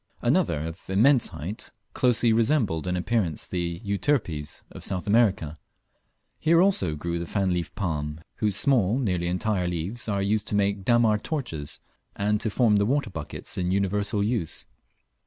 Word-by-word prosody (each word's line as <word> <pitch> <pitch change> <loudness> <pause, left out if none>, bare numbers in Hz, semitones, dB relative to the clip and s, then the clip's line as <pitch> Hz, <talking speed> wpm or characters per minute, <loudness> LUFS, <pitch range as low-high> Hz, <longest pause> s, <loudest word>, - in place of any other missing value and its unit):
Another 75 - +2
of 80 +2 -6
immense 120 +7 +4
height 90 +9 -6 0.2
closely 120 -2 +3
resembled 110 - +1
in 90 0 0
appearance 90 -3 -1
the 85 -1 -3
Euterpes 100 - -1
of - - -9
South 95 0 -2
America. 100 -8 +2 0.8
Here 165 +1 +4
also 175 - +3
grew 85 +3 -3
the 85 - -4
fan 95 -1 0
leafed 85 -2 -3
palm, 75 -5 -3 0.2
whose 105 -3 0
small, 120 -4 +2
nearly 90 -9 0
entire 90 +1 0
leaves 90 +8 -3
are 100 -1 0
used 105 +1 0
to 105 - 0
make 100 0 +2
the 100 - -12
dammar 115 -3 +4
torches, 110 - -4 0.3
and 105 +1 0
to 110 - 0
form 105 -1 +3
the 100 - +3
water 135 -3 0
buckets 80 +1 -6
in 90 -1 0
universal 100 +2 +1
use. 105 -6 -2
100 Hz, 160 wpm, -26 LUFS, 85-115 Hz, 0.8 s, immense